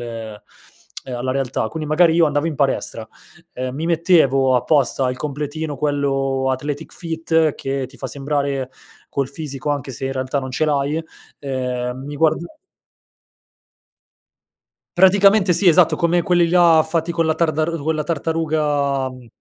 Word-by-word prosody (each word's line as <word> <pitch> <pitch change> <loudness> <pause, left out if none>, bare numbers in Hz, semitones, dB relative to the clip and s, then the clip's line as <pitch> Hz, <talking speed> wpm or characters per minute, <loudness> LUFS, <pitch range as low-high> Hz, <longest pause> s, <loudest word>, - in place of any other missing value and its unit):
ehm, 115 -3 -7 0.8
alla 130 +2 -2
realtà. 130 -4 -2
Quindi, 155 -2 -5
magari 160 +1 +4
io 170 -1 +5
andavo 145 +1 0
in 160 - -2
palestra, - - -1 0.5
ehm, 130 0 -4
mi 155 +3 -4
mettevo 155 -7 +3
apposta 135 -1 +1
il 130 - -5
completino 150 +1 -4
quello 135 -2 0
athletic 145 +4 -4
fit 160 -2 0
che 135 0 -3
ti 130 +1 -17
fa 135 - -4
sembrare 140 -2 -2 0.4
col 140 -1 -1
fisico 140 -1 -6
anche 140 -2 -3
se 135 +1 -4
in 135 - -3
realtà 130 +1 -2
non 130 - -6
ce 140 +5 0
l'hai, 145 +1 0 0.4
ehm, 130 -1 -3
mi 145 0 -6
guarda 160 0 +2 2.6
Praticamente 195 +1 +5
sì, 190 +3 +2
esatto 170 0 +5
come 170 0 +1
quelli 175 -1 +2
là 170 -2 +5
fatti 165 +1 -1
con 165 -1 0
la 160 - +2
tardaru 160 0 -1
quella 155 0 -1
tartaruga, 150 -4 -1
mhmm, 125 -1 -13
145 Hz, 145 wpm, -20 LUFS, 135-160 Hz, 2.6 s, io